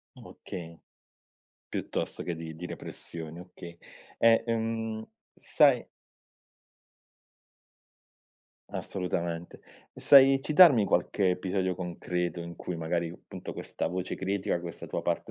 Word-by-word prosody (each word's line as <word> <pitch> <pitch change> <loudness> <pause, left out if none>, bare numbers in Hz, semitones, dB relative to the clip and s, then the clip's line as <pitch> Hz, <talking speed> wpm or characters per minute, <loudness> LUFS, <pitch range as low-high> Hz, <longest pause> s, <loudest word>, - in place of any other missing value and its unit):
Okay, 85 -2 -9 0.9
piuttosto - - -3
che 85 -2 -3
di 80 -1 -7
di 90 +2 -7
repressione, 80 -1 -8
okay. 90 -1 -11 0.4
Eh 115 0 +5
ehm, 115 -1 -2 0.3
sai - - +4 2.9
Assolutamente, 85 -2 -4 0.3
e - - -12
sai 135 -1 +7
citarmi 150 - +7
qualche 95 +2 +2
episodio 95 0 -1
concreto 90 -1 -3
in 85 0 -7
cui 90 - -5
magari, 85 +1 -1
appunto, 90 - -9
questa - - -4
voce 90 +1 -3
critica, 95 -2 -1
questa 85 -1 -7
tua - - -3
parte - - -2
90 Hz, 105 wpm, -29 LUFS, 85-110 Hz, 2.9 s, sai